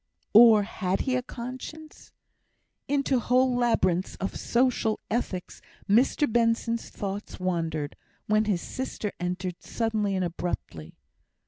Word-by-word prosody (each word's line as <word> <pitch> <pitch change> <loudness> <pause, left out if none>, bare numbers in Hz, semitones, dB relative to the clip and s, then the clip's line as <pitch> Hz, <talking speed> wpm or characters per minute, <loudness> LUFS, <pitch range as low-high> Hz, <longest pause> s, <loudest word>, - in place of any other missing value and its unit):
Or 220 -1 +8
had 190 -2 -2
he 260 -2 0
a 255 - +1
conscience? 255 +6 -9 0.8
Into 275 -2 +1
whole 250 +2 +3
labyrinths 190 -7 +1
of 195 - -4
social 235 -3 +1
ethics 200 -6 -3 0.3
Mr 240 +8 +4
Benson's 230 0 +1
thoughts 200 0 -5
wandered, 165 -5 -2 0.3
when 215 +1 +2
his 195 -5 0
sister 255 -5 -4
entered 180 0 -3
suddenly 215 -3 -1
and 185 -1 0
abruptly. 165 - -5
215 Hz, 115 wpm, -27 LUFS, 185-245 Hz, 0.8 s, Or